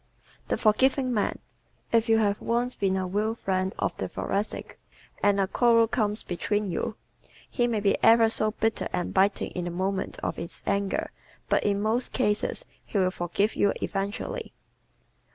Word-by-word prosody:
The - - 0
Forgiving 255 +4 +3
Man 210 - 0 0.6
¶ - - +5
If 230 0 +3
you 225 - +5
have 205 -2 +1
once 240 +2 0
been 190 -1 0
a 190 - -1
real 210 +4 -1
friend 190 -3 -1
of - - -1
a - - -1
Thoracic 200 +2 -3 0.4
and 205 -1 +3
a 195 - +3
quarrel 230 +2 +4
comes 215 -2 0
between 205 +2 -1
you, 210 - -2 0.5
he 240 -2 0
may 225 -3 0
be 200 -1 +1
ever 230 0 +7
so 215 -1 0
bitter 225 +1 -1
and 175 - -2
biting 195 +1 +2
in 180 - -4
the - - -2
moment 190 +2 -2
of - - -2
his 170 - -6
anger 200 -1 -1 0.4
but - - +2
in 200 0 +1
most 230 +4 0
cases 230 - 0 0.2
he - - -4
will 185 -1 +3
forgive 185 +4 -1
you 200 - +3
eventually. 205 - -3
210 Hz, 170 wpm, -27 LUFS, 195-225 Hz, 0.6 s, ever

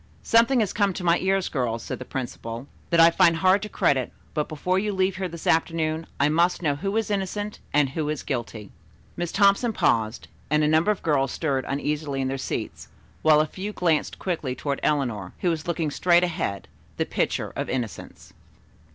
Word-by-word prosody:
"Something 235 +2 +4
has 205 - -1
come 200 -2 +1
to 180 - -6
my 170 0 +3
ears, 190 0 +1
girls," 115 -5 -2
said - - -5
the 130 - -7
principal, 120 -2 -5 0.2
"that 170 - +3
I 165 0 +8
find 170 -1 +4
hard 185 +4 +3
to 210 - -5
credit, 130 - +1 0.2
but 150 -1 -1
before 180 +5 0
you 210 +1 -1
leave 190 0 0
here 190 -1 -2
this 170 -1 -9
afternoon 160 0 +1
I 140 - +4
must 170 +4 +2
know 145 -3 +1
who 195 +8 -2
is 220 -1 -1
innocent 205 +1 -3
and 145 -2 +3
who 150 +2 -3
is 155 -2 -3
guilty." 115 -5 -4 0.4
Miss 175 -1 -3
Thompson 200 +4 +3
paused 110 - 0 0.2
and 150 +1 +3
a - - +3
number 160 +5 +3
of 210 - 0
girls 135 -5 +1
stirred 140 -5 -1
uneasily 145 0 -2
in 130 -1 0
their 135 0 -3
seats, - - -4 0.3
while 155 -1 +5
a - - +1
few 195 +6 -6
glanced 165 -6 0
quickly 155 -8 -3
toward 140 +2 -3
Eleanor, 120 -11 -1
who 175 - +2
was 160 -1 -4
looking 165 -3 -1
straight 175 +3 +4
ahead, 165 - -2 0.3
the - - 0
picture - - -2
of - - -3
innocence. 120 -5 -5
160 Hz, 195 wpm, -25 LUFS, 140-185 Hz, 0.4 s, I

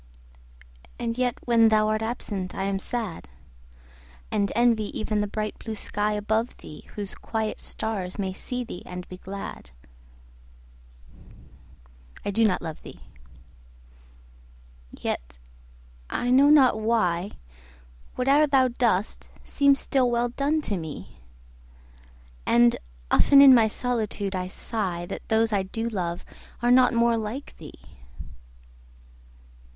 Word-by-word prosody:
And 230 -1 -3
yet 250 -1 0
when 230 -2 +5
thou 215 -1 +3
art 215 0 0
absent 210 -5 -4
I 190 - -2
am 195 0 -1
sad; 215 - -5 1.0
And 200 -1 0
envy 235 -2 +3
even 215 -1 -1
the 205 - -1
bright 215 +1 -4
blue 220 -1 -6
sky 210 0 -1
above 220 +3 -1
thee, 150 - -12
Whose 205 -2 -5
quiet 220 -1 -3
stars 195 -5 -4
may 190 -2 -2
see 250 +5 -4
thee 200 -6 -8
and 180 0 -8
be 185 - -9
glad. 195 +2 -8 2.6
I 205 - -1
do 225 +2 +3
not 185 - -1
love 160 -2 -6
thee!—yet, - - -12 0.7
I 245 - -1
know 275 +3 +6
not 265 -7 +5
why, 205 -5 +1 0.9
5 250 - 0
Whate'er 290 +3 +5
thou 265 -2 +3
dost 230 -5 -1
seems 280 -1 +3
still 260 -2 +1
well 240 0 +1
done, 285 +5 0
to 205 -9 -2
me: 160 -4 -8 1.3
And 120 0 +5 0.4
often 280 - +6
in 275 -1 +10
my 230 -3 +5
solitude 215 -4 -2
I 180 0 -2
sigh 185 -3 -3
That - - -8
those 220 0 +2
I 200 - +2
do 225 +5 -4
love 180 -5 -3 0.4
are 240 - +4
not 250 0 +6
more 235 0 +3
like 225 +6 -5
thee! - - -12
215 Hz, 125 wpm, -25 LUFS, 180-240 Hz, 2.6 s, in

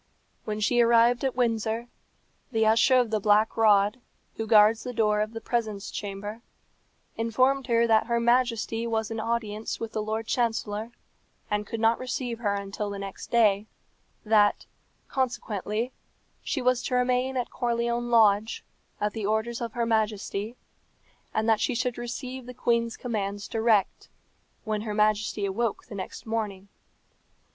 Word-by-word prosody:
When 215 -1 -3
she 240 +3 +3
arrived 235 +1 +4
at 265 -2 0
Windsor, 230 -1 0 0.6
the 220 -2 +2
Usher 225 +4 +5
of 245 -3 +2
the 215 - +1
Black 210 +2 +3
Rod, 210 +1 +3 0.3
who 225 - -4
guards 215 0 +6
the 250 - -6
door 210 -2 +2
of 215 +1 -2
the 225 - -5
presence 220 -4 -3
chamber, 205 +2 -6 0.8
informed 255 +4 +1
her 235 -1 +3
that 220 -1 +3
her 235 -1 +1
Majesty 235 -1 +1
was 220 -1 -1
in 225 - -3
audience 220 -1 -3
with 225 -1 -5
the 215 - -2
Lord 220 +1 -3
Chancellor, 225 -2 -1 0.6
and 210 0 -1
could 230 - -4
not 225 +1 +3
receive 250 -2 -3
her 205 -3 0
until 200 +1 -4
the 200 - -5
next 195 -1 -7
day; 215 -3 +3 0.6
that, 210 -1 +3 0.4
consequently, 235 -2 -2 0.5
she 270 -5 -2
was 250 0 +2
to 250 - -2
remain 250 +1 +1
at 245 - -2
Corleone 235 0 -1
Lodge, 220 -2 +3 0.3
at 210 0 -1
the 215 -3 -3
orders 225 +3 -1
of 230 -2 -4
her 235 -1 0
Majesty; 215 0 -1 0.8
and 220 +1 -1
that 220 -2 +4
she 255 - 0
should 240 0 -1
receive 250 +1 -6
the 250 - -8
queen's 235 -1 0
commands 205 -4 -3
direct, 220 -3 +1 0.5
when 215 -1 -2
her 210 -1 -4
Majesty 210 -1 +1
awoke 215 +3 -2
the - - -11
next 190 -2 -7
morning. 210 -3 -3
225 Hz, 155 wpm, -27 LUFS, 210-235 Hz, 0.8 s, guards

